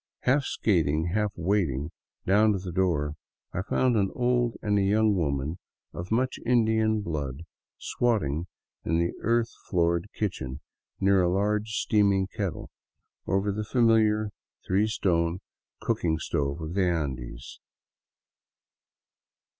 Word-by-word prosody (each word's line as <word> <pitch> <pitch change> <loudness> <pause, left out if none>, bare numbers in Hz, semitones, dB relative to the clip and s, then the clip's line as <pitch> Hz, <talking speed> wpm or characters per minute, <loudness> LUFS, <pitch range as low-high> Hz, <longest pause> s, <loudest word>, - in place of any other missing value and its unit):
Half 135 +2 +2
skating, 80 -5 +1
half 105 -1 +1
wading 85 -6 0 0.3
down 105 +3 +4
to - - -1
the 90 -1 -6
door, 80 -5 +1 0.4
I 95 - -1
found 125 +5 +1
an 100 -3 +2
old 120 -1 +1
and 105 -1 +2
a - - +2
young 105 +2 +3
woman 75 0 -1 0.3
of 85 +2 -6
much 125 +3 0
Indian 110 -2 +2
blood 75 -5 -4 0.3
squatting 90 - 0 0.4
in 80 - +1
the 85 +1 0
earth 115 +1 +1 0.2
floored 85 +1 +1
kitchen 70 -10 -3 0.4
near 95 -1 +4
a 90 - +2
large 105 +3 0
steaming 100 -4 +2
kettle 100 -2 -5 0.6
over 95 +1 +1
the 105 +2 -3
familiar 110 -2 +3 0.3
three 100 +3 +2
stone 85 -5 0 0.4
cooking 80 -2 0
stove 70 -1 -2
of 80 +1 -5
the 100 - +1
Andes. 65 -5 -4
95 Hz, 125 wpm, -27 LUFS, 85-110 Hz, 0.6 s, down